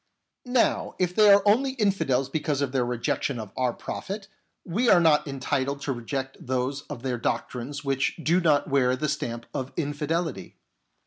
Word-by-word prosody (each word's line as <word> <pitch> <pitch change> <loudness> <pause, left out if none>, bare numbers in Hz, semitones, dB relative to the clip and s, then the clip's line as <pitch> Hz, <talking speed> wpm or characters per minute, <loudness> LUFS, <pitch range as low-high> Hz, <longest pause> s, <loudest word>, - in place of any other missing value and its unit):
Now, 245 -1 +1
if 180 -1 0
they 210 +2 +6
are 200 0 +6
only 260 +6 +3
infidels 195 - +1
because 150 0 -1
of 140 -3 0
their 130 -2 +1
rejection 120 +2 -1
of 110 -3 -7
our 130 -1 +1
prophet, 195 - -6 0.4
we 225 +8 +1
are 175 - +7
not 155 -3 +4
entitled 140 0 -2
to 140 - -1
reject 130 +2 -4
those 130 +2 -1
of 135 -5 -7
their 125 -2 -2
doctrines 135 +5 -3
which 135 0 0
do 170 +2 +2
not 150 -4 +3
wear 130 -3 +2
the 150 +4 -2
stamp 120 -4 -3
of 130 0 -4
infidelity. 155 +2 -2
140 Hz, 170 wpm, -26 LUFS, 130-170 Hz, 0.4 s, are